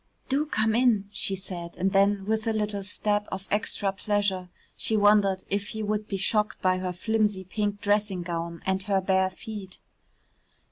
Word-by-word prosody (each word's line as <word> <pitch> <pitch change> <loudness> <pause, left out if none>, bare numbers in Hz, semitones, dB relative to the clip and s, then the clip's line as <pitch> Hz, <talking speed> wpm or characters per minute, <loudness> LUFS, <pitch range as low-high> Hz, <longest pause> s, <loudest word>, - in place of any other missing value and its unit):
"Do 285 +3 +1
come 220 -5 +1
in," 225 -4 +3
she 200 -1 0
said, 180 -3 -6
and 190 +2 +1
then, 200 0 +3
with 220 +1 -1
a 225 - +2
little 210 -2 -1
stab 205 +1 0
of 190 +1 -5
extra 205 -1 +1
pleasure, 195 -2 -1 0.3
she 220 - +1
wondered 205 -2 +4
if 200 +1 -1
he 220 0 -4
would 210 0 -1
be 195 - -2
shocked 210 +2 0
by 185 0 +2
her 185 -1 -2
flimsy 210 +1 0
pink 205 +2 -2
dressing 205 -3 +1
gown 170 -1 -4
and 190 0 +1
her 195 0 +1
bare 190 0 +2
feet. 195 -1 -8
200 Hz, 175 wpm, -27 LUFS, 190-210 Hz, 0.3 s, wondered